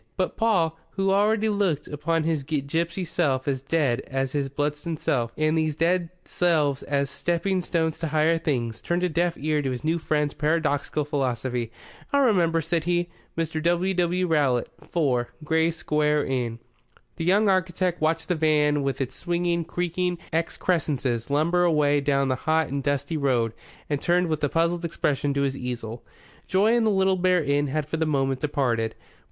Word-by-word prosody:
But 185 Hz, -, -1 dB
Paul, 170 Hz, -8 st, +1 dB
who 195 Hz, 0 st, +1 dB
already 210 Hz, +2 st, +3 dB
looked 200 Hz, -8 st, 0 dB
upon 155 Hz, +2 st, -1 dB
his 160 Hz, -2 st, 0 dB
gipsy 160 Hz, +5 st, -2 dB
self 145 Hz, -6 st, 0 dB
as 135 Hz, -2 st, 0 dB
dead 135 Hz, -4 st, +1 dB
as 135 Hz, 0 st, -2 dB
his 140 Hz, -1 st, -1 dB
Bludston 150 Hz, +3 st, -2 dB
self, 125 Hz, -7 st, 0 dB
and 155 Hz, +1 st, +2 dB
these 155 Hz, -2 st, 0 dB
dead 170 Hz, +1 st, +1 dB, 0.2 s
selves 150 Hz, -6 st, +1 dB
as 140 Hz, -1 st, 0 dB
stepping 175 Hz, +5 st, -1 dB
stones 165 Hz, -2 st, -1 dB
to 165 Hz, -, -2 dB
higher 155 Hz, +2 st, +2 dB
things, 120 Hz, -8 st, -2 dB
turned 175 Hz, +1 st, -1 dB
a 180 Hz, -, +2 dB
deaf 170 Hz, +1 st, 0 dB
ear 150 Hz, +1 st, 0 dB
to 135 Hz, -, -2 dB
his 125 Hz, +1 st, -4 dB
new 165 Hz, +2 st, +1 dB
friend's 150 Hz, -2 st, 0 dB
paradoxical 150 Hz, -1 st, 0 dB
philosophy. 125 Hz, -4 st, -2 dB, 0.4 s
"I'll 280 Hz, -1 st, +4 dB
remember," 170 Hz, -7 st, +3 dB
said 165 Hz, 0 st, -1 dB
he. 175 Hz, 0 st, 0 dB, 0.3 s
"Mr. 160 Hz, -1 st, -1 dB
W. 175 Hz, +3 st, +1 dB
W. 180 Hz, 0 st, +1 dB
Rowlatt, 145 Hz, -8 st, +1 dB, 0.2 s
4, 125 Hz, -7 st, +1 dB
Gray's 160 Hz, +2 st, +1 dB
Inn -, -, -8 dB
Square." 150 Hz, -1 st, +1 dB
The 120 Hz, -3 st, -2 dB, 0.6 s
young 200 Hz, +5 st, +3 dB
architect 185 Hz, -2 st, +1 dB
watched 160 Hz, +1 st, 0 dB
the -, -, +3 dB
van 150 Hz, -2 st, +2 dB
with 135 Hz, -1 st, -2 dB
its 130 Hz, -, -3 dB
swinging, 175 Hz, -1 st, -1 dB
creaking 175 Hz, +1 st, -2 dB, 0.2 s
excrescences 150 Hz, -8 st, -1 dB
lumber 165 Hz, +5 st, +2 dB
away 150 Hz, -4 st, +3 dB
down 140 Hz, -1 st, +1 dB
the 130 Hz, -, +1 dB
hot 160 Hz, -1 st, +2 dB
and 140 Hz, +1 st, -2 dB
dusty 140 Hz, +3 st, -1 dB
road, 125 Hz, -6 st, +1 dB, 0.3 s
and 145 Hz, -1 st, -2 dB
turned 175 Hz, 0 st, +2 dB
with 155 Hz, -1 st, -2 dB
a 145 Hz, -, +2 dB
puzzled 170 Hz, +2 st, +1 dB
expression 145 Hz, -3 st, 0 dB
to 140 Hz, -, +1 dB
his 135 Hz, -1 st, 0 dB
easel. 120 Hz, -3 st, -5 dB, 0.4 s
Joy 205 Hz, +4 st, +3 dB
in 235 Hz, -1 st, +3 dB
the -, -, +4 dB
Little 190 Hz, -2 st, +2 dB
Bear 180 Hz, -2 st, +2 dB
Inn 145 Hz, 0 st, +1 dB
had 145 Hz, +1 st, -2 dB
for 160 Hz, -, -2 dB
the 160 Hz, 0 st, 0 dB
moment 135 Hz, -3 st, 0 dB
departed. 125 Hz, -6 st, 0 dB
155 Hz, 175 wpm, -25 LUFS, 140-175 Hz, 0.6 s, I'll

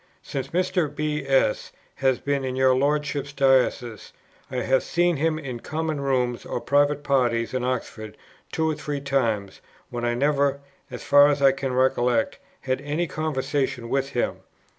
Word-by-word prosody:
Since 135 Hz, -, -4 dB
Mr. 180 Hz, -2 st, 0 dB
B. 150 Hz, -1 st, -3 dB
S. 135 Hz, -5 st, +1 dB, 0.3 s
has 130 Hz, -2 st, +2 dB
been 140 Hz, -1 st, -1 dB
in 130 Hz, -1 st, -3 dB
your 130 Hz, 0 st, +4 dB
Lordship's 145 Hz, 0 st, -1 dB
diocese, 130 Hz, -5 st, +1 dB, 0.4 s
I 130 Hz, -, -7 dB
have 130 Hz, +1 st, +2 dB
seen 175 Hz, -1 st, +1 dB
him 155 Hz, +2 st, +1 dB
in 130 Hz, -6 st, -6 dB
Common 155 Hz, +1 st, -3 dB
rooms 125 Hz, -3 st, 0 dB
or -, -, -4 dB
private 145 Hz, +1 st, +2 dB
parties 125 Hz, -5 st, +1 dB
in 130 Hz, -1 st, -1 dB
Oxford 115 Hz, -4 st, -4 dB, 0.3 s
two 160 Hz, 0 st, 0 dB
or 160 Hz, -, +1 dB
three 145 Hz, -1 st, -4 dB
times, 115 Hz, -8 st, -1 dB, 0.3 s
when 120 Hz, -1 st, -4 dB
I 120 Hz, 0 st, 0 dB
never 140 Hz, +1 st, +1 dB, 0.3 s
(as 125 Hz, -2 st, -8 dB
far 145 Hz, 0 st, +6 dB
as 145 Hz, -1 st, +1 dB
I 135 Hz, -1 st, +6 dB
can 135 Hz, -1 st, -3 dB
recollect) 125 Hz, -2 st, +1 dB, 0.2 s
had 130 Hz, 0 st, -2 dB
any 150 Hz, +4 st, -1 dB
conversation 140 Hz, -6 st, -2 dB
with 135 Hz, +1 st, 0 dB
him. 120 Hz, -, -1 dB
135 Hz, 160 wpm, -24 LUFS, 125-145 Hz, 0.4 s, far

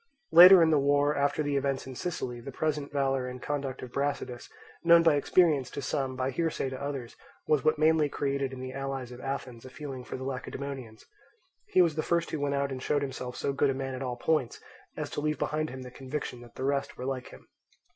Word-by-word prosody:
Later 180 Hz, +4 st, +11 dB
on 170 Hz, -, +6 dB
in 160 Hz, -, +4 dB
the 150 Hz, -, +4 dB
war, 145 Hz, +1 st, +3 dB
after 140 Hz, +2 st, +1 dB
the 145 Hz, -1 st, -1 dB
events 140 Hz, -1 st, -1 dB
in 130 Hz, -, -7 dB
Sicily, 125 Hz, -5 st, -4 dB
the 135 Hz, -, -7 dB
present 150 Hz, 0 st, -2 dB
valour 135 Hz, -2 st, 0 dB
and 125 Hz, 0 st, -6 dB
conduct 140 Hz, -1 st, -4 dB
of 125 Hz, -, -8 dB
Brasidas, 140 Hz, -3 st, -3 dB, 0.3 s
known 170 Hz, 0 st, +7 dB
by 165 Hz, -2 st, +5 dB
experience 145 Hz, -2 st, +3 dB
to 140 Hz, -, -5 dB
some, 135 Hz, -1 st, -2 dB
by 130 Hz, +1 st, -1 dB
hearsay 155 Hz, -2 st, -1 dB
to 130 Hz, -, -6 dB
others, 135 Hz, -4 st, -5 dB, 0.3 s
was 150 Hz, -3 st, +2 dB
what 155 Hz, 0 st, +3 dB
mainly 155 Hz, -1 st, +3 dB
created 140 Hz, -1 st, -1 dB
in 130 Hz, -1 st, -7 dB
the 130 Hz, 0 st, -6 dB
allies 135 Hz, -2 st, -4 dB
of 125 Hz, 0 st, -10 dB
Athens 130 Hz, -4 st, -5 dB
a 130 Hz, -, -10 dB
feeling 135 Hz, -2 st, -7 dB
for -, -, -6 dB
the 130 Hz, -, -7 dB
Lacedaemonians. 130 Hz, -3 st, -6 dB, 0.6 s
He 185 Hz, -, +5 dB
was 165 Hz, -3 st, +1 dB
the 155 Hz, -, -1 dB
first 170 Hz, +1 st, 0 dB
who 155 Hz, -, -2 dB
went 140 Hz, 0 st, 0 dB
out 140 Hz, 0 st, 0 dB
and 130 Hz, -1 st, -5 dB
showed 145 Hz, +1 st, 0 dB
himself 130 Hz, -2 st, -5 dB
so 140 Hz, -, -2 dB
good 140 Hz, +1 st, +2 dB
a 135 Hz, -, 0 dB
man 135 Hz, 0 st, -4 dB
at 130 Hz, -, -5 dB
all 125 Hz, -2 st, -2 dB
points 150 Hz, -2 st, 0 dB, 0.4 s
as -, -, -4 dB
to -, -, -3 dB
leave 150 Hz, 0 st, 0 dB
behind 155 Hz, +3 st, -1 dB
him 130 Hz, 0 st, -7 dB
the 125 Hz, -, -9 dB
conviction 130 Hz, -1 st, -5 dB
that 120 Hz, -1 st, -15 dB
the 130 Hz, -, -3 dB
rest 140 Hz, 0 st, -1 dB
were 125 Hz, -, -5 dB
like 130 Hz, -1 st, -3 dB
him. -, -, -14 dB
140 Hz, 235 wpm, -29 LUFS, 130-150 Hz, 0.6 s, Later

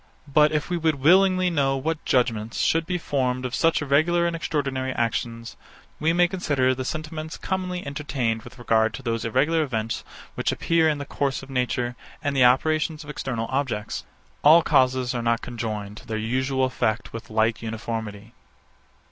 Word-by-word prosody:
But 150 Hz, +2 st, +4 dB
if 150 Hz, -1 st, -1 dB
we 175 Hz, -, +1 dB
would 160 Hz, -2 st, +1 dB
willingly 185 Hz, +5 st, +4 dB
know 135 Hz, -4 st, +1 dB
what 160 Hz, +4 st, -2 dB
judgement 115 Hz, -3 st, +1 dB
should 165 Hz, 0 st, +1 dB
be 180 Hz, 0 st, 0 dB
formed 130 Hz, -5 st, -1 dB
of 125 Hz, -, -4 dB
such 165 Hz, -2 st, +2 dB
irregular 155 Hz, +5 st, +3 dB
and 170 Hz, -1 st, 0 dB
extraordinary 135 Hz, -5 st, -2 dB
actions, 115 Hz, 0 st, -2 dB, 0.4 s
we 160 Hz, +2 st, +2 dB
may 175 Hz, +1 st, +4 dB
consider 145 Hz, -8 st, +1 dB
the 130 Hz, 0 st, -4 dB
sentiments 155 Hz, +3 st, -5 dB
commonly 185 Hz, -1 st, -3 dB
entertained 135 Hz, -6 st, -2 dB
with 120 Hz, -, -13 dB
regard 110 Hz, -2 st, +2 dB
to 135 Hz, -, -9 dB
those 115 Hz, -2 st, -2 dB
irregular 155 Hz, +8 st, +2 dB
events 115 Hz, -6 st, -2 dB, 0.3 s
which -, -, -1 dB
appear 165 Hz, -1 st, +2 dB
in 150 Hz, -, 0 dB
the 140 Hz, -, -5 dB
course 140 Hz, -1 st, -2 dB
of 135 Hz, -, -11 dB
nature, 125 Hz, -1 st, -1 dB, 0.3 s
and 145 Hz, -1 st, -1 dB
the 130 Hz, -, +5 dB
operations 155 Hz, +5 st, +2 dB
of 150 Hz, -, -7 dB
external 120 Hz, -5 st, -3 dB
objects. 130 Hz, -6 st, -2 dB, 0.4 s
All 160 Hz, +3 st, +7 dB
causes 130 Hz, -2 st, +2 dB
are 120 Hz, -, -2 dB
not 115 Hz, 0 st, 0 dB
conjoined 110 Hz, -4 st, -5 dB
to -, -, -13 dB
their 110 Hz, -, -2 dB
usual 130 Hz, +4 st, 0 dB
effects 120 Hz, -4 st, -1 dB
with 115 Hz, -, -8 dB
like 110 Hz, +1 st, +1 dB
uniformity. 110 Hz, -1 st, -5 dB
135 Hz, 175 wpm, -24 LUFS, 115-155 Hz, 0.4 s, All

